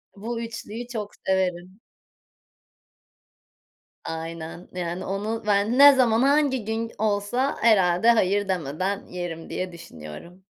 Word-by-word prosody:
bu 230 +3 -5
3'lüyü 230 0 -7
çok 215 -4 -5 0.2
severim. 185 0 -1 2.3
Aynen 165 +1 -6
yani 175 0 -4
onu 210 +4 -3
ben 205 +4 +2
ne 285 0 +10
zaman 245 -3 +3
hangi 280 -4 +2
gün 225 +1 -3
olsa 215 +5 0
herhâlde 195 -1 +4
hayır 205 -2 +2
demeden 185 +3 -2
yerim 175 -2 -6
diye 185 -1 -3
düşünüyorum. 170 - -11
200 Hz, 110 wpm, -25 LUFS, 180-230 Hz, 2.3 s, ne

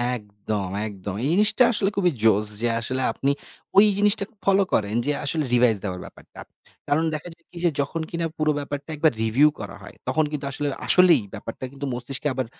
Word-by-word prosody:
একদম, 105 -2 -5 0.2
একদম। 100 -2 -6
এই - - +1
জিনিসটা 210 +6 +4
আসলে 200 -3 +1
খুবই 180 -3 +2
জোশ 105 -1 +4 0.2
যে, 120 - +2
আসলে 130 +3 -2
আপনি 140 +1 0 0.5
ওই 205 - +9
জিনিসটা 205 0 +3 0.2
ফলো 195 0 +4
করেন, 105 0 +1
যে 145 - +1
আসলে 155 +2 +1
রিভাইজ 120 -3 +4
দেওয়ার 90 -3 -4
ব্যাপারটা। - - -15 0.5
কারণ 150 +3 +2
দেখা 155 +3 -5
যায় - - -30
কি 180 - -12
যে - - +5
যখন 160 +4 -3
কিনা, 170 0 -2
পুরো 155 -1 +2
ব্যাপারটা 145 +1 -6
একবার 155 +1 +3
রিভিউ 125 +7 +4
করা 100 -2 -7
হয়, 100 - -12
তখন 145 +5 +2
কিন্তু 145 -2 -4
আসলে 145 +2 -2 0.2
আসলেই 180 -7 +6
ব্যাপারটা 115 +3 -6
কিন্তু 140 0 -6
মস্তিষ্কে 130 +4 -3
আবার 130 -1 -2
140 Hz, 190 wpm, -24 LUFS, 110-165 Hz, 0.5 s, ওই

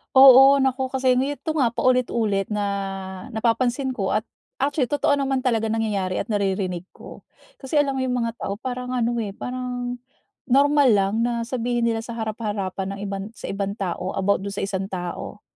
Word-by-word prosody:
Oo, 270 +1 +9
naku 265 0 0
kasi 260 -1 +2
neto 290 +4 -2
nga, 240 -5 +2
paulit-ulit 230 -6 +1
na 205 -1 0 0.7
napapansin 240 +4 +1
ko 205 -7 -2
at 215 - +2 0.4
actually 280 -1 +1
totoo 285 +2 +1
naman 270 -1 0
talaga 230 -3 +1
nangyayari 210 -4 -1
at - - -8
naririnig 190 -3 -1
ko. - - -12 0.3
Kasi 290 +2 +1
alam 275 -2 -1
mo - - 0
yung 250 - -1
mga 230 0 -3
tao, 200 - -3
parang 250 +3 -5
ano, 240 -1 0
eh, 205 -4 -3
parang, 245 +1 -4 0.5
normal 285 +1 +4
lang 195 0 +2
na 235 -1 -1
sabihin 240 -1 0
nila 225 -1 -1
sa 235 - -7
harap-harapan 205 -3 -3
ng 195 - -8
ibang 195 -1 -4
sa - - -8
ibang 200 0 -2
tao, 185 -2 -3
about 200 +1 +2
do'n 200 - -4
sa - - -4
isang 195 -1 -2
tao. 185 +2 -6
235 Hz, 175 wpm, -23 LUFS, 200-260 Hz, 0.7 s, Oo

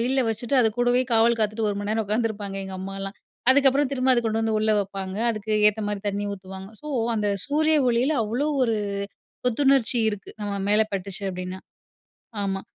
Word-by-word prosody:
வெயில்ல 260 +3 +1
வெச்சுட்டு, 225 +4 -2
அது 225 - +4
கூடவே 245 +1 +3
காவல் 230 +1 +4
காத்துட்டு 215 +1 0
1 200 - -3
மணி 205 +1 -3
நேரம் 220 0 0
உட்காந்துருப்பாங்க 210 -2 -2
எங்கம்மாலாம் 195 +1 -6 0.3
அதுக்கப்புறம் 275 0 +4
திரும்ப 260 -1 +2
அத 240 - +3
கொண்டு 225 0 0
வந்து 225 -1 0
உள்ள 215 0 +1
வப்பாங்க. 195 -1 -5
அதுக்கு 215 -1 -4 0.2
ஏத்த 210 +1 -2
மாரி 205 -1 -3
தண்ணி 205 0 -2
ஊத்துவாங்க. 190 0 -9
ஸோ 300 - -11 0.3
அந்த 210 -2 0 0.2
சூரிய 310 +2 +2
ஒளியில 245 +5 +2
அவ்வளோ 235 +7 -1 0.2
ஒரு 230 -3 +1 0.7
புத்துணர்ச்சி 265 0 +3
இருக்கு. 205 -2 -7
நம்ம 205 -1 -3 0.2
மேல 215 +1 +4
பட்டுச்சு 195 +1 -4
அப்டீனா 185 +1 -6 0.9
ஆமா. 195 -1 -2
220 Hz, 170 wpm, -24 LUFS, 200-245 Hz, 0.9 s, அது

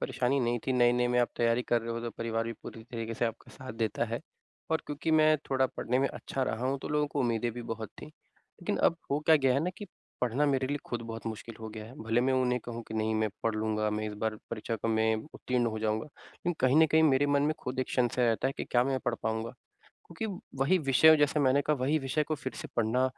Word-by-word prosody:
परेशानी 130 +2 0
नहीं 120 0 +1
थी, 130 - +2
नए-नए 120 0 +4
में 125 0 +2
आप 120 - +2
तैयारी 115 +1 +2
कर 120 -1 +3
रहे 115 - -5
हो 115 - -3
तो 120 0 -4
परिवार 115 0 -2
भी 115 - -3
पूरी 115 - -9
तरीके 115 -2 -5
से 120 - 0
आपका 115 0 -4
साथ 130 -2 -8
देता 115 0 -1
है 115 +1 -4 0.5
और 160 - +1
क्योंकि 150 +2 -2
मैं 155 0 +5
थोड़ा 130 -1 +3
पढ़ने 125 +2 0
में 135 - +3
अच्छा 135 - -4
रहा 120 0 -1
हूँ 135 +1 0
तो - - -4
लोगों 150 0 +1
को 145 -1 -3
उम्मीदें 120 -1 +1
भी 120 0 -6
बहुत 115 -1 -5
थी, - - -8
लेकिन 155 - -7
अब 170 - +3
हो 140 - +2
क्या 160 +1 +6
गया 135 -3 +3
है 135 - +2
ना 180 - 0
कि 205 - -7 0.3
पढ़ना 125 +4 +1
मेरे 135 -2 +1
लिए 145 +2 -1
खुद 120 -1 -3
बहुत 115 0 -7
मुश्किल 115 +1 -6
हो 110 - -5
गया 110 0 -8
है, 115 - -12
भले 115 +2 +2
मैं 130 +1 +2
उन्हें 125 -1 +2
कहूँ 120 0 -5
कि, 110 - -6
"नहीं 110 0 0
मैं 110 0 +1
पढ़ 115 -1 +1
लूँगा, 110 0 0
मैं 105 0 -2
इस 105 - -4
बार 110 0 -2
परीक्षा 115 0 -3
को 115 - -3
मैं 110 0 +2 0.2
उत्तीर्ण 125 -1 0
हो 110 -1 -2
जाऊँगा" 110 0 0
लेकिन 175 +4 -6
कहीं 130 +2 +4
न 160 - +6
कहीं 160 +2 +4
मेरे 145 -2 +4
मन 145 0 +3
में 155 +1 +1
खुद 125 +1 -5
एक - - -3
संशय 125 0 +2
रहता 115 +3 +1
है 135 - -3
कि - - -3
क्या 120 0 +2
मैं 135 -1 0
पढ़ 120 - +1
पाऊँगा? 110 +1 -1 0.6
क्योंकि 170 +6 -5 0.3
वही 165 +8 +4
विषयों 155 +1 +6
जैसे 150 0 +2
मैंने 135 +1 +4
कहा 150 - +1
वही 140 +4 +1
विषय 135 +2 0
को 155 +1 -1
फिर 130 -3 -5
से - - -7
पढ़ना 120 +2 +2
125 Hz, 260 wpm, -30 LUFS, 115-140 Hz, 0.6 s, क्या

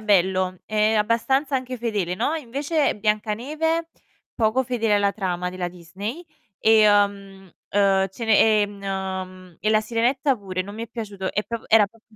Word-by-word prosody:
bello, 185 -3 +2
ehm, 215 0 +2
abbastanza 265 +6 +1
anche 255 -1 -5
fedele, 205 -6 -1
no, 300 - 0
invece 290 +2 -1
Biancaneve, 250 +11 -1 0.5
poco 225 +3 +2
fedele 230 -4 0
alla 200 -1 +2
trama 180 -3 -2
della 180 -1 -4
Disney, 190 - -7 0.3
ehm, 200 -3 +3 0.2
ehm, 195 -1 +3
Cene 220 +2 +1 0.2
ehm, 190 -3 -5
e 215 - +1
La 215 - +4
Sirenetta 245 +5 +1
pure, 190 -3 -5
non 200 +2 -9
mi 225 - -6
è 230 - -6
piaciuto 205 -5 -5
è 210 - 0
prop 230 -1 -6
era 220 -2 +6
prop 225 +2 -24
210 Hz, 150 wpm, -23 LUFS, 190-235 Hz, 0.5 s, era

